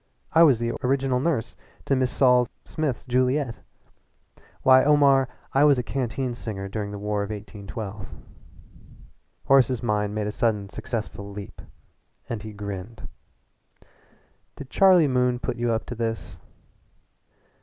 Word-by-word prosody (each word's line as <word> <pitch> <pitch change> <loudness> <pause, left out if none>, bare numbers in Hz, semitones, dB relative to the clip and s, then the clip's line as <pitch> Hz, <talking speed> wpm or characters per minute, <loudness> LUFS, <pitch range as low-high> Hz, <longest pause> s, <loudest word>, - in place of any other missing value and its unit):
I 165 - +6
was 145 -7 +6
the 115 +1 -2
original 130 0 +1
nurse 140 -5 -1 0.3
to - - +1
Mrs. 130 -1 +2
Sol 125 -1 +3 0.2
Smith's 155 -6 -3
Juliette. 130 0 0 1.0
Why, 130 0 +7
Omar, 140 -2 +4 0.2
I 135 - +4
was 145 -2 +5
a 125 - -1
canteen 130 0 -2
singer 105 -4 -6
during 105 +1 -4
the 100 - -6
War 105 0 -2
of 100 - -4
1812." 105 0 -7 1.4
Horace's 130 -3 +3
mind 105 -2 0
made 105 -1 -1
a 105 - -2
sudden 105 -3 -1
successful 105 -2 -5
leap, 100 -1 -9 0.7
and 115 -3 -4
he 110 +1 -8
grinned. 100 +1 -7 1.5
"Did 135 - -10
Charlie 185 -5 +5
Moon 125 -1 +1
put 120 - -4
you 120 0 0
up 110 -1 -1
to - - -6
this?" 115 -1 -4
120 Hz, 135 wpm, -25 LUFS, 105-130 Hz, 1.5 s, Why